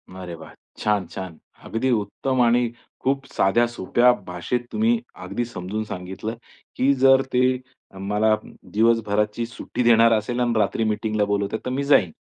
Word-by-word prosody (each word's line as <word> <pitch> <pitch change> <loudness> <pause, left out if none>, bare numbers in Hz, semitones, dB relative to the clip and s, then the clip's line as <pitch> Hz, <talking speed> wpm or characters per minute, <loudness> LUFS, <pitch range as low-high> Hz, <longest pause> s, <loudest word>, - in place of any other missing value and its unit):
अरे 90 -2 -7
वाह. 80 -2 -12 0.2
छान, 105 -3 0
छान. 95 -3 -8 0.3
अगदी 120 +4 -1
उत्तम 120 +4 0
आणि 120 0 +3 0.3
खूप 135 +1 0
साध्या, 115 +5 +3
सोप्या 120 +2 +3 0.2
भाषेत 90 +8 -3
तुम्ही 225 +2 +2 0.2
अगदी 120 - -3
समजून 105 -1 -4
सांगितलं, 95 +3 -6 0.4
की 135 +2 +3
जर 135 0 +5
ते 125 - +3 0.5
अ, 95 - -14
मला 105 +3 +2 0.4
दिवसभराची 110 0 +1
सुट्टी 115 +2 -4
देणार 115 -1 +6
असेल 110 +3 -1
आणि 120 -1 +1
रात्री 115 - +1
मीटिंगला 110 -1 0
बोलवतात, 100 +1 -1
तर - - -1
मी 135 +2 -1
जाईन 125 - +4
110 Hz, 150 wpm, -23 LUFS, 100-125 Hz, 0.5 s, देणार